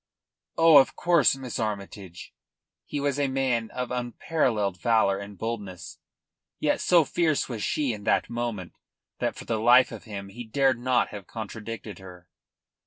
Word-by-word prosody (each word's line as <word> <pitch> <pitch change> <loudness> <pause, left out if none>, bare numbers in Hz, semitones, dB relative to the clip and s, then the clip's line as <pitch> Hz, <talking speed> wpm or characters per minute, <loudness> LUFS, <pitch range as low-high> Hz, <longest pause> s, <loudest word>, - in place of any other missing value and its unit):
"Oh, 165 -3 +8
of 135 - +2
course, 170 -7 +3
Miss 130 -3 -6
Armytage!" 100 -4 -6 0.5
He 145 - -4
was 140 0 -1
a 140 - +2
man 130 -4 0
of 125 -1 -5
unparalleled 120 - -1
valour 110 -4 +2
and 100 0 -9
boldness, 105 -5 -6 0.6
yet - - +1
so 170 -4 +4
fierce 160 0 0
was 115 -4 -5
she 135 +3 0
in 105 -1 -8
that - - +2
moment 120 -6 -4 0.5
that - - -1
for - - -10
the 115 -2 -1
life 120 +3 +5
of - - -9
him 100 -3 -7
he 120 +5 -8
dared 130 +2 +1
not 125 0 +1
have 100 -2 -9
contradicted 110 -2 -7
her. 90 -1 -13
115 Hz, 160 wpm, -26 LUFS, 100-135 Hz, 0.6 s, Oh